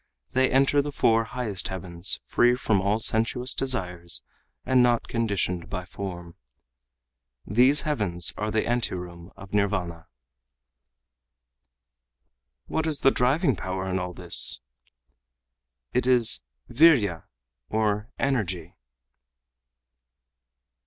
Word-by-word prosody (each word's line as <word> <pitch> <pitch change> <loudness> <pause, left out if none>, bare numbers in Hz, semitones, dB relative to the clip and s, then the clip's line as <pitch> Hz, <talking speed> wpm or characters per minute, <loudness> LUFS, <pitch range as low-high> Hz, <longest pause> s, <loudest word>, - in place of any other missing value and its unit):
] 60 +1 -49
they 130 0 +3
enter 135 +2 +3
the 145 +1 -5
four 115 -4 +2
highest 115 -6 -2
heavens 90 0 +1
free 120 0 +3
from 110 -6 0
all 100 +3 +1
sensuous 115 +3 +1
desires 90 - -2 0.4
and 130 -1 +3
not 120 -1 +2
conditioned 100 -7 -2
by 90 0 -5
form. 90 -3 -7 1.1
These 125 +8 +5
heavens 100 - 0
are 105 +1 -3
the 110 0 0
anteroom 90 -7 -3
of 95 0 -13
Nirvana." 90 -5 -1 2.6
"What 160 0 -2
is 150 -3 0
the 135 - +5
driving 135 - +1
power 95 +1 -4
in 95 0 -1
all 90 -1 -5
this?" - - 0 1.3
"It 125 0 0
is 120 - +3 0.3
vîrya 120 - +3 0.4
or 110 0 -1
energy." 95 - -2
105 Hz, 105 wpm, -25 LUFS, 90-125 Hz, 2.6 s, These